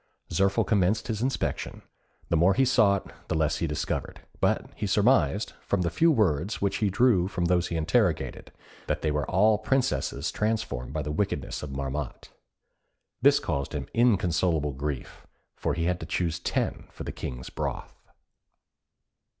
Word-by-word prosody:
Zirphil 95 +1 +2
commenced 100 +2 +1
his 110 -1 -2
inspection; 130 +2 -2 0.5
the - - +2
more 90 +4 +4
he 135 - +4
sought, 105 -7 +3
the - - -1
less 80 -1 +1
he 85 - -1
discovered, 75 -1 -3 0.2
but - - +1
he 105 - -3
surmised, 105 +1 +2
from 100 -2 0
the 85 - 0
few 165 - +4
words 100 - +1
which 100 -1 0
he 105 - +1
drew 100 -3 +3
from 90 -3 -2
those 90 0 +2
he 85 - -4
interrogated, 85 - 0 0.4
that - - -2
they 80 - +1
were 75 -1 -1
all 105 +3 +4
princesses 110 - 0
transformed 105 - -2
by 75 0 -2
the 75 - -3
wickedness 95 +6 -2
of 75 - -6
Marmotte. 70 0 -4 0.9
This - - +6
caused 70 -1 -2
him - - -3
inconsolable 90 -9 +2
grief, 70 -1 -5 0.3
for - - -1
he 85 - -1
had 90 +1 0
to 80 - -7
choose 80 0 -1
ten - - -2
for - - -9
the - - -4
King's 65 0 -6
broth. - - -4
90 Hz, 160 wpm, -27 LUFS, 75-105 Hz, 0.9 s, This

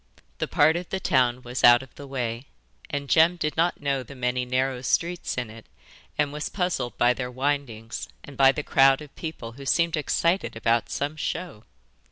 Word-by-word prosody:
The - - -1
part 155 +2 +4
of 175 0 -6
the 190 - -2
town 130 -7 +1
was 125 +1 -5
out 120 +1 +8
of 130 - -16
the 145 - -10
way, 125 -2 -4 0.4
and 140 0 -3
Jem 165 +4 +5
did 155 -3 -2
not 170 0 +1
know 140 -2 0
the 135 +3 -11
many 125 0 -1
narrow 130 0 -1
streets 170 +7 -1
in 125 -3 -3
it 115 0 -13 0.5
and 145 -1 +1
was 150 0 -4
puzzled 180 -10 -2
by 120 +1 +4
their 125 0 -4
windings 130 -4 -3
and 145 - -11
by 135 0 +6
the 150 +2 -4
crowd 135 0 +4
of 145 - -15
people, 155 -8 -6
who 135 +4 -11
seemed 170 +3 +2
excited 170 +3 0
about 115 +1 +1
some 145 +2 -2
show. 155 -8 -4
135 Hz, 195 wpm, -25 LUFS, 125-155 Hz, 0.5 s, out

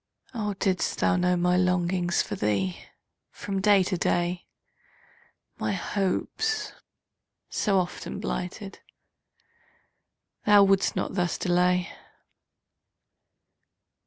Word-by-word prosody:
Oh, 210 -4 -3
didst 190 -1 0
thou - - +2
know 180 0 +2
my 180 +1 +2
longings 180 -1 +1
For - - -6
thee, 100 -3 -1 0.5
from 195 -1 -4
day 200 -1 +5
to 185 +1 -2
day, 175 +1 0 1.1
My 110 -1 -1
hopes, 425 - -2 0.8
so 200 -3 +1
often 180 -1 -3
blighted, 195 +2 -5 1.7
Thou 205 -1 +7
wouldst 195 0 +2
not - - -2
thus 180 -3 0
delay! 180 +1 +1
180 Hz, 95 wpm, -26 LUFS, 175-195 Hz, 1.7 s, Thou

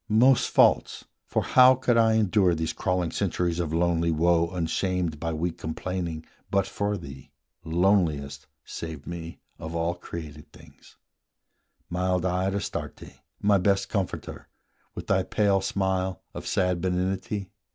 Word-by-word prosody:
most 120 +4 +4
false! - - +3 0.2
for - - 0
how 130 +1 +6
could 125 -2 +1
I 115 -1 +4
endure 100 -4 +3
These 80 0 -2
crawling 90 -2 -1
centuries 90 -3 -1
of 85 -3 -2
lonely 85 0 +1
woe 85 +1 +2
Unshamed 90 -1 -1
by 85 +1 -2
weak 80 +1 -3
complaining, 85 0 -4 0.2
but 100 -1 +2
for 100 +1 -2
thee, 70 -6 -10 0.3
Loneliest, 80 -5 +1 0.2
save 80 -4 -7
me, 85 -1 -7 0.2
of 80 +1 -6
all 85 +1 0
created 80 -4 -9
things, - - -18 0.9
Mild 90 0 0
eyed 95 +2 0
Astarte, 100 - -6 0.2
my 100 -1 +4
best 100 +1 +1
comforter, 100 -5 -4 0.5
With - - -6
thy 95 -1 +2
pale 100 0 +1
smile 95 -1 -1
of - - -7
sad 90 -2 +1
benignity? 95 +2 -2
90 Hz, 135 wpm, -26 LUFS, 85-95 Hz, 0.9 s, how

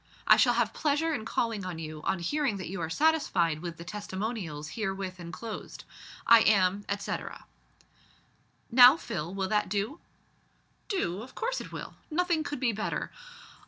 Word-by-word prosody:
I - - +8
shall 245 -2 +4
have 230 -2 +1
pleasure 315 +2 +1
in 220 -7 -3
calling 225 -3 -1
on 180 -2 -5
you 155 -1 -7
on - - +1
hearing 220 - -1
that 185 - -6
you 185 -1 -4
are 160 - -2
satisfied 185 - +2
with 170 -1 -6
the 170 - -8
testimonials 190 -5 -5
herewith 190 -3 -4
enclosed. 190 +6 -7 0.4
I 230 - +8
am, 200 -2 +3
etcetera." 200 0 -4 1.3
"Now, 250 +4 +9
Phil, 175 - -4
will 190 -1 -2
that 210 -3 +1
do?" 210 - -2 0.9
"Do? 200 - -1
of 255 +3 -11
course - - -2
it - - -10
will. - - -7 0.2
Nothing 340 0 +1
could 285 -2 -4
be 250 -3 +2
better. 215 0 -3
210 Hz, 160 wpm, -29 LUFS, 180-255 Hz, 1.3 s, Now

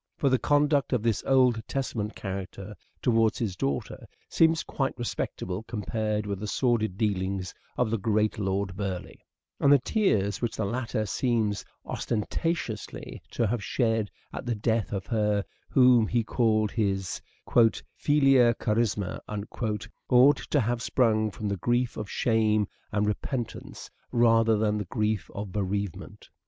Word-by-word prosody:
For 140 - +2
the 130 -1 +3
conduct 145 -1 +2
of 120 -4 +1
this 115 -3 +1
Old 125 -4 +4
Testament 115 -6 -3
character 95 +1 -6 0.3
towards 115 -3 +3
his 105 -6 -2
daughter 70 -5 -3 0.2
seems 160 0 +3
quite 135 -1 -2
respectable 100 -5 -3
compared 105 -1 -2
with 100 -2 -3
the 105 - -4
sordid 110 -4 +1
dealings 95 -3 -1 0.2
of 120 -3 +1
the 115 - 0
great 110 +1 +1
Lord 95 -1 -1
Burleigh; 95 -2 -5 0.4
and 140 - +4
the 145 - +8
tears 110 - +1
which 120 -2 -1
the 110 - -1
latter 115 0 -2
seems 110 -1 0 0.2
osten 110 -3 -2
tatiously 165 -10 -3
to 120 - 0
have 110 0 -1
shed 110 -2 0 0.2
at - - -5
the 120 - 0
death 110 +2 0
of 95 -3 -3
her 105 -4 +1 0.2
whom 125 -4 +5
he 120 -1 +1
called 110 -2 +1
his 95 -4 -1 0.3
" 115 -2 +3
filia 135 -5 +5
carissima 105 -5 0 0.8
" - - -50
ought 130 +3 +6
to 145 - 0
have 120 0 0
sprung 110 -4 +2
from 105 +1 -5
the 100 -1 -1
grief 120 +5 0
of 105 -1 -5
shame 110 -3 +2 0.2
and 105 0 +1
repentance 115 +3 -4 0.2
rather 115 -2 +4
than 105 0 +1
the 105 - -3
grief 105 +1 -1
of 100 -1 -5
bereavement. 100 -1 -4
110 Hz, 150 wpm, -27 LUFS, 105-120 Hz, 0.8 s, the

